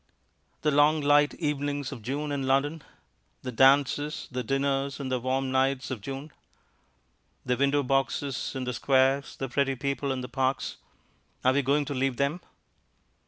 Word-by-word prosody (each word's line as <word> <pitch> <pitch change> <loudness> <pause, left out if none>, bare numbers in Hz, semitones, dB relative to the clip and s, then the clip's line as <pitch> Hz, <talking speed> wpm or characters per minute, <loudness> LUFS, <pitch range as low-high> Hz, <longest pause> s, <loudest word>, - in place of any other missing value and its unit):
The 150 - +3
long 150 +2 +4
light 145 0 +4
evenings 145 -3 -2
of 115 - -8
June 145 +6 -3
in 135 -2 -2
London! 145 +4 +1 0.6
The 125 - -4
dances, 140 +4 +3
the 125 0 -2
dinners 135 +2 -1
in 135 -2 -4
the 130 -1 0
warm 130 +1 -1
nights 130 -1 +1
of 120 -5 -4
June! 135 +6 -6 1.1
The 125 - +1
window 140 +2 +2
boxes 135 0 -1
in 130 - -3
the 125 0 -3
squares, 135 +2 +2
the 135 - -4
pretty 135 +1 0
people 140 +1 -2
in 130 -1 -2
the 125 - -5
parks; 130 +1 -1 0.7
are 130 - +5
we 140 - +3
going 140 +2 +1
to 145 - -4
leave 130 -1 0
them? 140 +6 0
135 Hz, 165 wpm, -27 LUFS, 130-145 Hz, 1.1 s, are